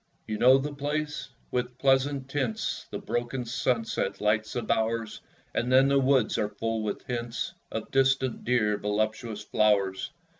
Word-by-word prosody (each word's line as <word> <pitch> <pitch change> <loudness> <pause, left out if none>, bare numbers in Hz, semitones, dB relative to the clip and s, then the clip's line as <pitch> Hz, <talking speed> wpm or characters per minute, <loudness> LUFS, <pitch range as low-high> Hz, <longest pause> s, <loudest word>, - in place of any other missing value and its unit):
You 110 -1 -4
know 130 +2 +7
the 145 +2 -3
place? 150 +1 -3 0.2
With 125 0 -2
pleasant 135 0 +2
tints 135 -5 -2
The - - -4
broken 120 +1 -3
sunset 115 -5 -1
lights 110 +1 +1
the 120 - -2
bowers; 110 0 -1 0.3
And 125 +2 0
then 135 +1 +6
the 140 0 +4
woods 130 -3 +3
are 105 - 0
full 115 +2 -2
with 105 -1 -4
hints 120 -1 -3 0.2
Of - - -5
distant, 135 -2 +2
dear, 105 -4 +2
voluptuous 110 +1 -2
flowers! 100 -1 +2
120 Hz, 150 wpm, -28 LUFS, 110-135 Hz, 0.3 s, know